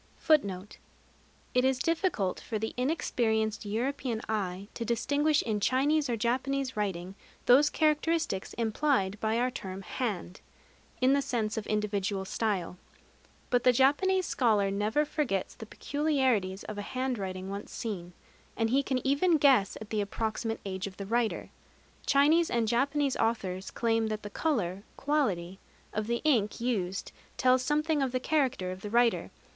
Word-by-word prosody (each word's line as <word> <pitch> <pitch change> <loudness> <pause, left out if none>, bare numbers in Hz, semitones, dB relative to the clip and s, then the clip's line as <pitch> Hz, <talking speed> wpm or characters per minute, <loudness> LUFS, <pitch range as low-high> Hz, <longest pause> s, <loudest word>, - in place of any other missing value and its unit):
It 250 - +3
is 265 0 +2
difficult 325 - 0
for 220 - -4
the 220 +1 -3
inexperienced 225 -6 0
European 245 +2 -2
eye 195 -3 -2
to 235 - -4
distinguish 285 +7 +1
in 215 -2 -1
Chinese 285 +6 +2
or 235 - 0
Japanese 260 +4 -1
writing 190 -3 -2 0.3
those 275 +4 +6
characteristics 310 - 0
implied 220 -3 0
by 220 +1 0
our 250 +1 +1
term 190 -5 -6
"hand" 195 -6 -4 0.6
in 260 +2 +5
the 280 - +3
sense 225 -5 -1
of 220 - -4
individual 205 -2 -1
style. 190 -4 -2 0.7
But 245 -1 +3
the 250 - +6
Japanese 320 +9 +3
scholar 210 -9 +2
never 210 +9 +1
forgets 270 - -1
the 220 - -10
peculiarities 260 -11 0
of 210 -1 -6
a 205 - -6
handwriting 195 -7 -2
once 200 +1 -6
seen; 180 -6 -5 0.4
and 225 -1 +1
he 270 +2 +4
can 260 -1 -2
even 310 +5 +3
guess 265 -9 +4
at 215 - -10
the 215 -1 +1
approximate 220 +2 -3
age 190 0 -3
of 190 - -10
the 200 - -5
writer. 230 +2 -1 0.6
Chinese 310 +4 +4
and 235 -2 +1
Japanese 275 +4 +1
authors 195 -5 -1
claim 225 -1 +1
that 215 0 -4
the 205 - -7
color 200 - -1 0.2
(quality) 195 - 0 0.3
of 215 0 -2
the 235 0 -1
ink 235 -9 +2
used 200 -6 -2 0.3
tells 255 -1 +4
something 300 +2 +1
of 265 -2 0
the 255 - 0
character 265 -10 0
of 185 0 -8
the 210 - -5
writer. 235 +1 +2
230 Hz, 150 wpm, -29 LUFS, 205-275 Hz, 0.7 s, those